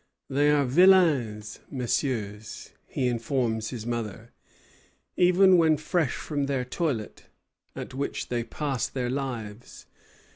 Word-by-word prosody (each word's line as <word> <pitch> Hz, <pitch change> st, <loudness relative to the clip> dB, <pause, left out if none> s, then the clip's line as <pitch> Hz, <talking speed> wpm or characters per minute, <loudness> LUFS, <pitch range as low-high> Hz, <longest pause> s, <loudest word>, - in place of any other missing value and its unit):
"They 145 Hz, +2 st, +3 dB
are 145 Hz, -1 st, +3 dB
vilains 135 Hz, -, +3 dB
messieurs," 115 Hz, -5 st, -3 dB, 0.2 s
he 130 Hz, -, -1 dB
informs 115 Hz, -2 st, -1 dB
his 115 Hz, -4 st, -6 dB
mother, 115 Hz, -1 st, -5 dB, 0.8 s
"even 180 Hz, +1 st, +5 dB
when 160 Hz, -2 st, +4 dB
fresh 155 Hz, -1 st, 0 dB
from 145 Hz, -2 st, -3 dB
their 135 Hz, -3 st, -1 dB
toilet, 130 Hz, -5 st, -3 dB, 0.5 s
at -, -, -7 dB
which 140 Hz, +2 st, -4 dB
they 120 Hz, -1 st, -1 dB
pass 135 Hz, +2 st, -2 dB
their 125 Hz, -2 st, -3 dB
lives. 120 Hz, -5 st, -6 dB
130 Hz, 115 wpm, -27 LUFS, 115-150 Hz, 0.8 s, even